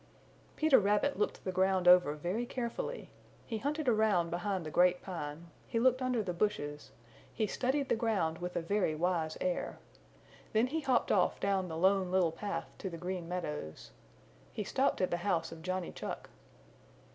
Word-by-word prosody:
Peter 310 -3 +5
Rabbit 210 +7 +1
looked 210 - -1
the 185 - -2
ground 185 0 +2
over 180 -4 +7
very 180 +10 -2
carefully. 245 - -4 0.3
He 225 -2 -3
hunted 295 +3 -2
around 215 -7 +3
behind 180 0 -2
the 155 - -5
Great 180 +2 +3
Pine, 165 -2 -6 0.2
he 230 - 0
looked 255 +2 +3
under 250 -3 +1
the 180 -3 -3
bushes, 150 -8 -2 0.4
he 220 - 0
studied 260 +6 0
the - - +2
ground 195 -8 0
with 180 0 -5
a 170 - -1
very 185 -3 +1
wise 165 -1 0
air. 180 -1 -2 0.8
Then 220 +2 +4
he 300 +6 -2
hopped 265 -4 +2
off - - +2
down 195 -2 0
the 160 -2 -5
Lone 190 +1 +3
Little 180 -3 +3
Path 165 -1 -4
to 190 - -4
the 170 - -7
Green 180 0 -4
Meadows. 150 - -5 0.6
He - - -3
stopped - - +1
at 185 - +1
the 175 - +1
house 170 -3 -1
of 165 -1 -9
Johnny 185 +1 -3
Chuck. - - -6
185 Hz, 175 wpm, -33 LUFS, 170-220 Hz, 0.8 s, over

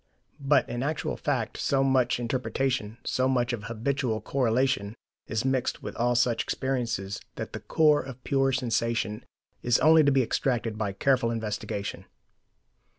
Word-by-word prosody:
But 140 0 +3
in 120 - -4
actual 150 +3 -2
fact 125 -7 -2
so 135 -1 +1
much 130 -3 +2
interpretation, 125 -1 -1
so 130 0 +1
much 125 -2 +1
of 105 -3 -5
habitual 115 +1 -1
correlation, 120 -3 0 0.3
is 110 +3 -2
mixed 130 -2 0
with - - -6
all 120 +1 +1
such 120 -1 +2
experiences, 115 -7 -2
that - - -6
the - - -4
core 150 -2 +3
of 130 -1 -10
pure 135 -1 +2
sensation 115 -3 -1 0.4
is 120 0 +3
only 160 0 +6
to 140 - +4
be 135 -1 +3
extracted 115 -2 -1
by 105 -2 -2
careful 130 +2 +2
investigation. 105 -3 -4
125 Hz, 150 wpm, -27 LUFS, 115-135 Hz, 0.4 s, only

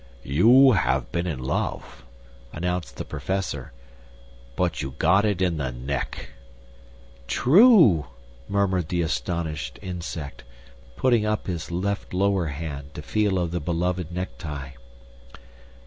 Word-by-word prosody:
"You 120 - +6
have 70 - +1
been 85 +1 -1
in 80 -6 -2
love," 65 - -3 0.5
announced 90 -6 -3
the - - -5
Professor; 75 -3 -3 0.8
"but 90 -3 0
you 65 0 -5
got 95 +6 +4
it 100 -3 +1
in 85 -3 +1
the 65 -4 -2
neck." 60 +2 -4 1.0
"True!" 165 - +6 0.4
murmured 95 -4 0
the 85 -2 0
astonished 75 -3 -3
Insect, 85 -8 -6 0.5
putting 120 - +2
up 105 0 -1
his 85 -4 -4
left 95 +2 -3
lower 95 -2 +2
hand 70 -1 -6
to 75 - -7
feel 105 +3 +1
of 85 -2 -1
the 90 - -1
beloved 85 +2 -1
necktie. 75 -6 -5
85 Hz, 120 wpm, -25 LUFS, 75-95 Hz, 1.0 s, You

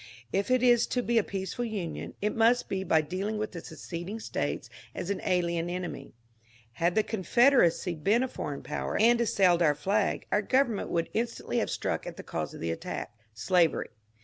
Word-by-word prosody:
If 200 +4 0
it 255 -1 +3
is 240 -2 +5
to 245 - -1
be 235 -1 +3
a - - +1
peaceful 195 +6 -4
Union 205 -8 -4
it 210 - 0
must 230 +2 +3
be 190 0 -1
by 160 -3 +3
dealing 190 +8 -3
with 215 0 -3
the 170 - -7
seceding 175 +6 -6
States - - -3 0.3
as 185 - -3
an 200 - -2
alien 170 -2 0
enemy. 180 -7 -5 0.6
Had 170 +8 0
the 215 - +4
Confederacy 220 -4 +3
been 200 +10 +2
a - - 0
foreign 145 - -5
power - - -3
and 235 +2 +5
assailed 185 -6 +3
our 150 -3 +4
flag, 195 +8 0
our 205 - +3
government 250 -1 +1
would 165 -1 -1
instantly 230 +1 -1
have - - -1
struck - - -2
at - - -7
the - - -7
cause - - -4
of - - -10
the 85 - -1
attack 80 - -5 0.2
— - - -41
slavery. 165 +9 +2
195 Hz, 195 wpm, -29 LUFS, 170-230 Hz, 0.6 s, is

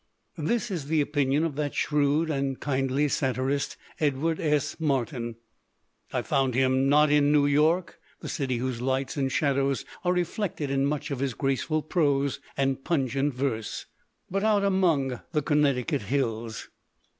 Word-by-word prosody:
This 225 +8 -1
is 160 -7 -3
the 160 +1 +2
opinion 145 0 +1
of 160 -4 -1
that 145 -1 -2
shrewd 150 +2 +1
and 135 -2 -1
kindly 135 +1 0
satirist, 135 +1 -1 0.2
Edward 155 +2 0
S. 150 -1 0
Martin. 130 -5 -1 0.8
I - - -1
found 135 -3 +1
him 130 +1 +3
not 150 +1 +5
in 145 -1 +4
New 150 -1 +4
York, 155 +5 +2 0.2
the - - -7
city 130 -5 -1
whose 125 -1 -3
lights 130 +1 -1
and 135 -2 0
shadows 140 -2 +1 0.2
are 180 - +2
reflected 180 -4 -2
in 135 0 +2
much 150 0 -2
of 135 - -2
his 135 -3 -1
graceful 135 +4 0
prose 140 -5 +1 0.2
and 135 -1 0
pun 140 -7 0
gent 135 +2 -1
verse, 125 -5 -2 0.4
but 195 +2 -2
out 210 -2 +3
among 165 -10 +2
the 150 -2 +1
Connecticut 145 -1 +1
hills. 115 -1 -2
140 Hz, 155 wpm, -27 LUFS, 135-150 Hz, 0.8 s, not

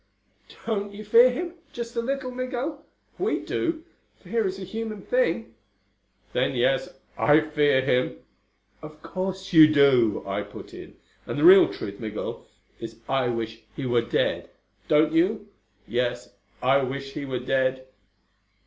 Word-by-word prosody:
"Don't 205 -3 -2
you 215 +1 -9
fear 235 +4 +7
him 345 +7 -4 0.2
just 235 0 -6
a 235 - 0
little, 265 +1 -3
Migul? 255 +4 -4 0.4
We - - 0
do. 330 -1 -2 0.4
Fear 215 +2 -1
is 190 0 -4
a 195 - -7
human 220 +1 -6
thing." - - 0 0.8
"Then 130 +1 0
yes, 130 +2 +1 0.3
I 150 +1 +5
fear 150 -3 +2
him." 125 - 0 0.6
"Of 155 0 -12
course 190 0 -5
you 155 -2 +8
do," 130 -7 +4
I 100 +1 -2
put 100 0 -11
in. - - -11 0.3
"And - - -4
the 145 - 0
real 190 +3 +8
truth, 100 0 -7
Migul, 110 -2 -6 0.3
is 115 0 -8
I 135 -2 +1
wish 115 -1 -4
he 140 - -5
were 120 -1 +2
dead. 115 - -1 0.4
Don't 155 +1 +3
you?" 205 +5 +1 0.4
"Yes. 120 -1 -2 0.3
I 130 +2 +4
wish 135 +1 -5
he 145 - -5
were 130 -2 -3
dead." 130 +1 0
155 Hz, 150 wpm, -25 LUFS, -, 0.8 s, you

